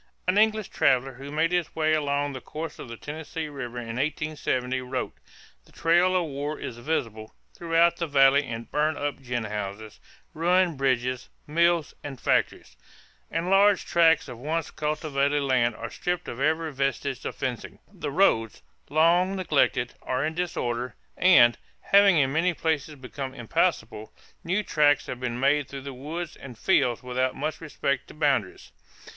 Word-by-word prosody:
An 185 Hz, -, +2 dB
English 215 Hz, -1 st, +2 dB
traveler 130 Hz, +1 st, +2 dB
who 135 Hz, +3 st, -9 dB
made 160 Hz, +3 st, +1 dB
his 175 Hz, -3 st, -1 dB
way 155 Hz, -1 st, +2 dB
along 145 Hz, -1 st, 0 dB
the 130 Hz, -, -7 dB
course 160 Hz, 0 st, -7 dB
of -, -, -8 dB
the 115 Hz, -, -7 dB
Tennessee 155 Hz, +2 st, -6 dB
River 125 Hz, -4 st, -7 dB
in 115 Hz, -1 st, -5 dB
1870 135 Hz, -3 st, -1 dB
wrote: 125 Hz, 0 st, -4 dB, 0.5 s
"The -, -, -22 dB
trail 175 Hz, +3 st, +3 dB
of 180 Hz, -2 st, +2 dB
war 145 Hz, +1 st, -4 dB
is 120 Hz, -, -6 dB
visible 115 Hz, -6 st, -3 dB, 0.2 s
throughout 170 Hz, 0 st, +2 dB
the 170 Hz, -, -2 dB
valley 140 Hz, 0 st, +5 dB
in 115 Hz, 0 st, -5 dB
burnt 150 Hz, +4 st, 0 dB
up 145 Hz, -1 st, -3 dB
gin 120 Hz, -2 st, -3 dB
houses, 105 Hz, 0 st, -6 dB, 0.3 s
ruined 175 Hz, -1 st, +2 dB
bridges, 130 Hz, -1 st, 0 dB, 0.2 s
mills, 170 Hz, +1 st, +2 dB
and 140 Hz, -3 st, -7 dB
factories... -, -, 0 dB, 0.5 s
and 165 Hz, +3 st, -2 dB
large 200 Hz, 0 st, +4 dB
tracts 165 Hz, -3 st, +4 dB
of 125 Hz, -3 st, -9 dB
once 155 Hz, +4 st, -2 dB
cultivated 145 Hz, -2 st, -1 dB
land 125 Hz, -4 st, +2 dB
are 115 Hz, +1 st, -7 dB
stripped 180 Hz, 0 st, -3 dB
of 120 Hz, -, -6 dB
every 160 Hz, +2 st, 0 dB
vestige 135 Hz, -1 st, -2 dB
of -, -, -4 dB
fencing. 125 Hz, -3 st, -4 dB, 0.2 s
The 170 Hz, -6 st, -5 dB
roads, 115 Hz, -, +2 dB, 0.3 s
long 175 Hz, +5 st, +3 dB
neglected, 140 Hz, -8 st, +1 dB
are 130 Hz, +3 st, -1 dB
in 160 Hz, -, -2 dB
disorder 125 Hz, -8 st, -3 dB, 0.2 s
and, 120 Hz, -11 st, +6 dB, 0.2 s
having 200 Hz, -3 st, +5 dB
in 135 Hz, -2 st, +2 dB
many 170 Hz, +2 st, +1 dB
places 155 Hz, -2 st, -1 dB
become 135 Hz, 0 st, -7 dB
impassable, 110 Hz, -2 st, -1 dB, 0.3 s
new 190 Hz, +4 st, 0 dB
tracks 145 Hz, -5 st, +3 dB
have 125 Hz, -, -6 dB
been 125 Hz, -1 st, -3 dB
made 140 Hz, +1 st, +2 dB
through 140 Hz, -1 st, -7 dB
the 140 Hz, 0 st, -7 dB
woods 155 Hz, +6 st, -6 dB
and 125 Hz, -4 st, -11 dB
fields 120 Hz, -1 st, +2 dB
without 130 Hz, +1 st, -1 dB
much 155 Hz, +4 st, -4 dB
respect 140 Hz, -3 st, -2 dB
to -, -, -13 dB
boundaries." 140 Hz, -, -1 dB
145 Hz, 165 wpm, -26 LUFS, 125-165 Hz, 0.5 s, and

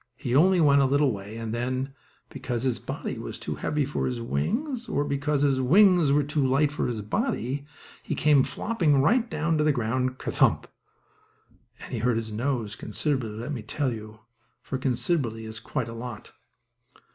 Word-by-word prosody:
He 125 Hz, 0 st, -2 dB
only 180 Hz, +5 st, +5 dB
went 140 Hz, -3 st, +5 dB
a -, -, +4 dB
little 140 Hz, 0 st, +3 dB
way, 105 Hz, +1 st, -7 dB
and 115 Hz, -1 st, -4 dB
then, 130 Hz, +3 st, -2 dB, 0.4 s
because 120 Hz, -2 st, -4 dB
his 130 Hz, -3 st, 0 dB
body -, -, -5 dB
was -, -, -6 dB
too -, -, -4 dB
heavy 150 Hz, -2 st, -1 dB
for 145 Hz, -, -2 dB
his 125 Hz, -2 st, -3 dB
wings, 230 Hz, -, -2 dB
or 145 Hz, -, 0 dB
because 145 Hz, 0 st, 0 dB
his 135 Hz, -2 st, +2 dB
wings 175 Hz, +1 st, +5 dB
were 145 Hz, +1 st, +4 dB
too 145 Hz, 0 st, 0 dB
light 135 Hz, +3 st, +2 dB
for 150 Hz, -, -1 dB
his 110 Hz, -4 st, -3 dB
body, 140 Hz, -, -2 dB, 0.3 s
he -, -, -3 dB
came 150 Hz, -2 st, +4 dB
flopping 170 Hz, -, +1 dB
right 230 Hz, -, +3 dB
down 160 Hz, 0 st, 0 dB
to -, -, +3 dB
the 150 Hz, -, +4 dB
ground, 130 Hz, +1 st, -1 dB
ker -, -, -4 dB
thump, -, -, +3 dB, 1.2 s
and -, -, -8 dB
he 120 Hz, -, -1 dB
hurt 120 Hz, +1 st, +1 dB
his 110 Hz, -1 st, -4 dB
nose 115 Hz, -2 st, -2 dB
considerably, 130 Hz, -3 st, -2 dB
let 115 Hz, +6 st, -6 dB
me 125 Hz, -, -4 dB
tell 130 Hz, +4 st, -2 dB
you, 110 Hz, -1 st, -9 dB, 0.4 s
for 130 Hz, -, -4 dB
considerably 125 Hz, -3 st, -1 dB
is 110 Hz, 0 st, -7 dB
quite 115 Hz, +2 st, -3 dB
a 115 Hz, -, -7 dB
lot. 115 Hz, -1 st, -8 dB
130 Hz, 185 wpm, -26 LUFS, 115-150 Hz, 1.2 s, only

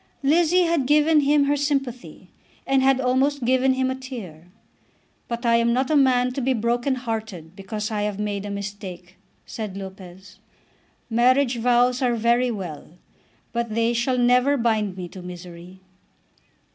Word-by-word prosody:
Lizzie 340 Hz, +5 st, +3 dB
had 330 Hz, -6 st, 0 dB
given 300 Hz, +2 st, +4 dB
him 290 Hz, 0 st, +3 dB
her 285 Hz, +1 st, +1 dB
sympathy, 275 Hz, -4 st, -3 dB, 0.3 s
and 270 Hz, 0 st, +2 dB
had 265 Hz, 0 st, +3 dB
almost 265 Hz, +1 st, +1 dB
given 260 Hz, +1 st, +2 dB
him 260 Hz, 0 st, 0 dB
a -, -, -1 dB
tear. 225 Hz, -, -9 dB, 0.8 s
"But 235 Hz, +1 st, -5 dB
I 230 Hz, 0 st, +4 dB
am 235 Hz, 0 st, +2 dB
not 260 Hz, +3 st, 0 dB
a -, -, +3 dB
man 250 Hz, -3 st, +3 dB
to 270 Hz, -, -3 dB
be 260 Hz, +1 st, +1 dB
broken 240 Hz, +3 st, 0 dB
hearted 220 Hz, -9 st, -6 dB
because 210 Hz, +3 st, -5 dB
I 210 Hz, -1 st, -2 dB
have 205 Hz, -1 st, -2 dB
made 205 Hz, -1 st, -3 dB
a 205 Hz, -, -6 dB
mistake," 195 Hz, -3 st, -7 dB, 0.3 s
said 215 Hz, -5 st, -6 dB
Lopez. 190 Hz, -1 st, -11 dB, 0.7 s
"Marriage 245 Hz, +2 st, +2 dB
vows 245 Hz, +2 st, +2 dB
are 245 Hz, -2 st, +1 dB
very 235 Hz, +2 st, +2 dB
well, 180 Hz, -6 st, -7 dB, 0.6 s
but 235 Hz, -2 st, -2 dB
they 230 Hz, +1 st, +1 dB
shall 240 Hz, +2 st, 0 dB
never 250 Hz, +3 st, +3 dB
bind 215 Hz, -5 st, 0 dB
me 180 Hz, -1 st, -5 dB
to 185 Hz, -, -10 dB
misery." 180 Hz, +1 st, -11 dB
240 Hz, 160 wpm, -23 LUFS, 205-260 Hz, 0.8 s, given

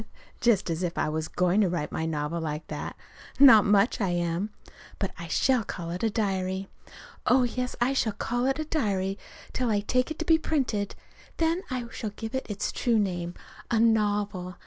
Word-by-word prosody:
Just 220 Hz, -8 st, +2 dB
as 165 Hz, +1 st, -2 dB
if 175 Hz, -1 st, -2 dB
I -, -, +1 dB
was 155 Hz, 0 st, -2 dB
going 180 Hz, +5 st, +2 dB
to 195 Hz, -, +3 dB
write 170 Hz, -4 st, -2 dB
my 160 Hz, -, -2 dB
novel 155 Hz, +1 st, -2 dB
like 155 Hz, -1 st, -4 dB
that! -, -, -5 dB, 0.4 s
Not 265 Hz, -7 st, +9 dB
much 205 Hz, +3 st, +3 dB
I 195 Hz, -, +1 dB
am. 175 Hz, +3 st, -1 dB, 0.5 s
But 195 Hz, -, -2 dB
I 170 Hz, -, -6 dB
shall 255 Hz, +7 st, +2 dB
call 170 Hz, -4 st, -5 dB
it 180 Hz, -, -4 dB
a 225 Hz, -, +2 dB
diary. 190 Hz, -3 st, -1 dB, 0.6 s
Oh, 255 Hz, +1 st, +5 dB
yes, 250 Hz, +1 st, -2 dB
I 245 Hz, +3 st, +2 dB
shall 225 Hz, -5 st, +1 dB
call 245 Hz, +4 st, -1 dB
it 270 Hz, -, +1 dB
a 310 Hz, -, -3 dB
diary 200 Hz, -, -1 dB, 0.3 s
till 250 Hz, -2 st, 0 dB
I 205 Hz, -2 st, +2 dB
take 255 Hz, +6 st, +1 dB
it 315 Hz, -, -5 dB
to 325 Hz, -, -3 dB
be 320 Hz, 0 st, +5 dB
printed. 250 Hz, -11 st, -1 dB, 0.4 s
Then 330 Hz, +2 st, +1 dB
I 255 Hz, -2 st, -3 dB
shall 215 Hz, -, -4 dB
give 225 Hz, +3 st, -7 dB
it 265 Hz, -, -2 dB
its 205 Hz, -1 st, -2 dB
true 235 Hz, -2 st, +1 dB
name 175 Hz, -4 st, -1 dB, 0.3 s
a 230 Hz, -, +2 dB
novel. 205 Hz, -5 st, +1 dB
205 Hz, 195 wpm, -27 LUFS, 180-245 Hz, 0.6 s, Not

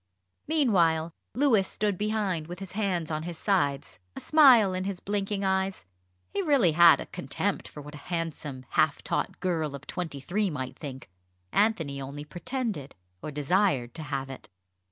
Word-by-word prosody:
Meanwhile, 170 Hz, -, +2 dB, 0.2 s
Louis 240 Hz, -8 st, +3 dB
stood 205 Hz, -2 st, 0 dB
behind, 205 Hz, -5 st, -1 dB
with 175 Hz, +1 st, -7 dB
his 195 Hz, -1 st, -8 dB
hands 185 Hz, -6 st, -1 dB
on 155 Hz, 0 st, -1 dB
his 170 Hz, 0 st, -6 dB
sides, 140 Hz, -, 0 dB, 0.2 s
a -, -, -5 dB
smile 255 Hz, -11 st, +6 dB
in 185 Hz, +1 st, -2 dB
his 195 Hz, -2 st, -3 dB
blinking 200 Hz, 0 st, -2 dB
eyes. 190 Hz, -, 0 dB, 0.5 s
He 400 Hz, -, 0 dB
really 280 Hz, -, +4 dB
had 170 Hz, +1 st, +7 dB
a -, -, -5 dB
contempt -, -, -3 dB
for 150 Hz, -, -10 dB
what 150 Hz, +1 st, -10 dB
a 150 Hz, -, -9 dB
handsome 155 Hz, -6 st, -4 dB
half -, -, +2 dB
taught -, -, -2 dB
girl 160 Hz, -5 st, -1 dB
of 140 Hz, +1 st, -10 dB
twenty 165 Hz, -6 st, -4 dB
three 195 Hz, +8 st, 0 dB
might 130 Hz, -4 st, -5 dB
think. 135 Hz, -3 st, -8 dB, 0.4 s
Anthony 165 Hz, -10 st, +1 dB
only 140 Hz, +2 st, -7 dB
pretended 200 Hz, -, -4 dB, 0.3 s
or -, -, -5 dB
desired 145 Hz, -3 st, +1 dB
to 165 Hz, -, -7 dB
have 135 Hz, -2 st, -4 dB
it. 130 Hz, -, -10 dB
175 Hz, 165 wpm, -28 LUFS, 145-205 Hz, 0.5 s, had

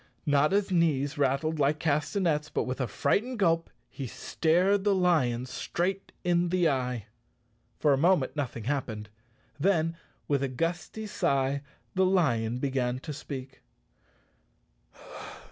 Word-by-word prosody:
Notta's 155 Hz, +8 st, +2 dB
knees 150 Hz, -4 st, +1 dB
rattled 145 Hz, +3 st, +1 dB
like 145 Hz, +2 st, +3 dB
castanets, 155 Hz, +1 st, 0 dB
but -, -, -1 dB
with 130 Hz, +1 st, -3 dB
a 125 Hz, -, 0 dB
frightened 235 Hz, -, 0 dB
gulp 165 Hz, -4 st, +2 dB, 0.2 s
he 135 Hz, -, -6 dB
stared 180 Hz, -, +1 dB
the 205 Hz, -1 st, +3 dB
lion 135 Hz, -10 st, +2 dB
straight 185 Hz, +8 st, -3 dB
in 175 Hz, -1 st, +2 dB
the 180 Hz, -1 st, +3 dB
eye. 125 Hz, -5 st, -1 dB, 0.7 s
For 145 Hz, -, +3 dB
a 135 Hz, -, +1 dB
moment 170 Hz, -4 st, +3 dB
nothing 125 Hz, -6 st, -3 dB
happened, 110 Hz, -5 st, -3 dB, 0.5 s
then 165 Hz, -1 st, +2 dB, 0.3 s
with 140 Hz, -2 st, +1 dB
a 140 Hz, -, +1 dB
gusty 170 Hz, -, -3 dB
sigh 140 Hz, -7 st, 0 dB, 0.3 s
the 190 Hz, -, +2 dB
lion 125 Hz, -11 st, +2 dB
began 125 Hz, -2 st, -1 dB
to 150 Hz, +3 st, -6 dB
speak. 135 Hz, -2 st, -8 dB
150 Hz, 130 wpm, -29 LUFS, 130-175 Hz, 0.7 s, like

